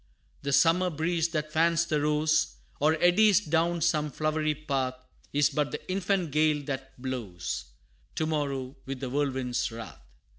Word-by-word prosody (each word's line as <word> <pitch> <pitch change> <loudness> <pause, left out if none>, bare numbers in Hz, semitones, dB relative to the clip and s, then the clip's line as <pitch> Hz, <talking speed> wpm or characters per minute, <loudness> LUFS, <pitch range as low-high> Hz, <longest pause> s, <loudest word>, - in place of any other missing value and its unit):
The 140 - -2
summer 170 +5 +4
breeze 165 +1 0
that 155 -2 -3
fans 165 +1 +3
the 155 -3 0
rose, 150 - +2 0.2
Or 155 +2 +3
eddies 195 +3 +5
down 170 -2 0
some 155 -2 +2
flowery 155 +1 0
path, 135 -4 -2 0.4
Is 145 -1 +3
but 150 -2 0
the 150 - -6
infant 185 -3 0
gale 150 0 +2
that 135 -2 -6
blows 115 -10 -4 0.5
To 160 - 0
morrow 140 -4 -2
with 135 -1 -4
the 130 -1 -4
whirlwind's 130 -4 -1
wrath. 115 0 -9
150 Hz, 150 wpm, -28 LUFS, 135-165 Hz, 0.5 s, eddies